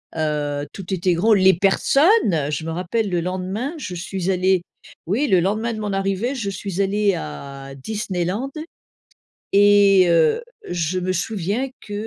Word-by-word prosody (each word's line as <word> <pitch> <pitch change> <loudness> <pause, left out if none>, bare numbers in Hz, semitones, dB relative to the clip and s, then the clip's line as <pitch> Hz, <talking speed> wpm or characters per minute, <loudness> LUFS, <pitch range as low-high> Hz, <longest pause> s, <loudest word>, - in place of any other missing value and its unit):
heu, 145 -2 -2
tout 190 -1 -6
était 180 0 +1
gros, 215 +6 +3
les 190 -1 +5
personnes! 205 - +3 0.3
Heu, 150 -2 -1
je 150 +2 -3
me 165 - -3
rappelle 190 +5 -2
le 175 -1 0
lendemain 185 - -3
je 185 -11 -6
suis 180 +2 -3
allée 185 0 +2 0.4
oui 235 - 0
le 185 -5 +4
lendemain 215 +5 -1
de 215 - -6
mon 205 -2 -3
arrivée, 195 +6 -1
je 225 -7 -3
suis 195 0 -4
allée 200 0 +1
à 135 - -8
Disneyland 195 - -3 1.0
et 200 -2 +6
heu, 170 - +3 0.3
je 175 +1 -1
me 185 +1 -1
souviens 200 +6 -2
que, 205 - -13
190 Hz, 160 wpm, -21 LUFS, 170-205 Hz, 1.0 s, et